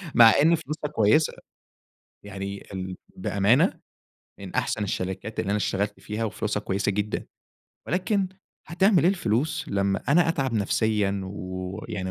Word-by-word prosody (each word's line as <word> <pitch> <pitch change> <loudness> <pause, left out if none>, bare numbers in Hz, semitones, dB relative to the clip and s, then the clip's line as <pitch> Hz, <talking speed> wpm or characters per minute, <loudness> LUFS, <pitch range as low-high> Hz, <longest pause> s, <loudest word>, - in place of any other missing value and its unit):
مع 115 -2 +9
إن 165 +3 +5
فلوسها 155 -1 -5
كويسة، 115 +9 +4 0.9
يعني 100 0 -6
ال 95 -1 -5 0.2
بأمانة، 125 - +2 0.6
من 95 -2 -8
أحسن 110 -4 0
الشركات 95 +2 -3
اللي 100 - -1
أنا 105 - +2
اشتغلت 100 0 -1
فيها، 105 +4 -3
وفلوسها 105 0 -2
كويسة 100 +1 0
جدًا، 105 +1 -2 0.6
ولكن 190 +3 0 0.4
هتعمل 180 0 +3
إيه 175 - +5
الفلوس 145 - -1
لمّا 100 0 0
أنا 165 +4 +4
أتعب 135 -6 0
نفسيًا 105 -1 +1
ويعني، 95 0 -5
105 Hz, 130 wpm, -26 LUFS, 100-150 Hz, 0.9 s, مع